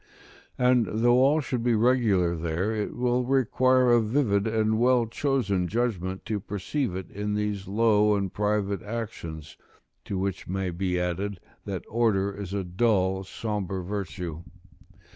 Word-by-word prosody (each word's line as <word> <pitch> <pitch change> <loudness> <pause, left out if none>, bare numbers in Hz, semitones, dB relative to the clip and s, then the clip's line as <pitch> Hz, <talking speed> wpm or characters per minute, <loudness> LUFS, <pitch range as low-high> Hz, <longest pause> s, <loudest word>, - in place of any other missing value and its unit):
And 125 -3 +3
though 120 +3 +3
all 145 +4 +4
should 125 -3 -2
be 120 0 +2
regular 110 -7 +3
there, 85 +6 -1
it 105 -1 -3
will 125 0 +1
require 130 0 +3
a 120 -1 +5
vivid 110 -3 +1
and 110 0 +1
well 125 0 +4
chosen 110 -7 0
judgment 95 -4 -2
to 110 -2 -2
perceive 105 +3 -3
it 95 -1 -6
in 105 +1 -3
these 105 -2 -2
low 105 0 +3
and 100 -2 -2
private 105 -2 0
actions; 105 -9 -6 0.5
to 100 - -3
which 95 0 -3
may 95 0 -2
be 90 +1 -1
added, 90 +2 -2 0.3
that 95 -3 -5
order 105 -4 +1
is 100 -2 -6
a 100 -1 -2
dull, 95 0 +1
sombre 95 -2 -4
virtue. 90 -4 -5
105 Hz, 145 wpm, -26 LUFS, 95-120 Hz, 0.5 s, a